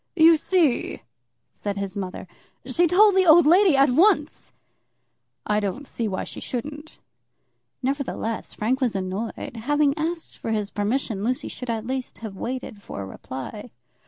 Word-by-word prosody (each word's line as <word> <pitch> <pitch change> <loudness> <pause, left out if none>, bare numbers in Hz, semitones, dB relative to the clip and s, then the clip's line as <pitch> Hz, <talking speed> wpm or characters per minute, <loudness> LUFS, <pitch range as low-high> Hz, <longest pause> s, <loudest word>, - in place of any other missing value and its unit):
"You 330 -1 +7
see," 320 -4 +1 0.5
said 205 -1 -4
his 200 0 -4
mother, 190 -1 -5 0.4
"she 335 +7 +2
told 410 +5 +6
the 375 -1 +4
old 330 +1 +8
lady 355 -1 +5
at 275 -1 +5
once." 315 +1 +2 0.9
"I 210 0 +1
don't 210 +8 -3
see 230 -3 -3
why 190 -2 -2
she - - -7
shouldn't." 295 +5 -6 0.9
Nevertheless 260 -4 -3
Frank 255 +6 0
was 240 -6 +1
annoyed. 195 +5 -4
Having 290 +4 +2
asked 330 +1 -3
for 225 - -3 0.2
permission, 210 -1 -1
Lucy 250 +3 -1
should 250 - -7
at 225 -1 -2
least 260 0 -4
have 205 -3 -7
waited 235 -1 -5
for 100 - -7
a - - -6
reply. 130 - -8
255 Hz, 150 wpm, -24 LUFS, 210-305 Hz, 0.9 s, old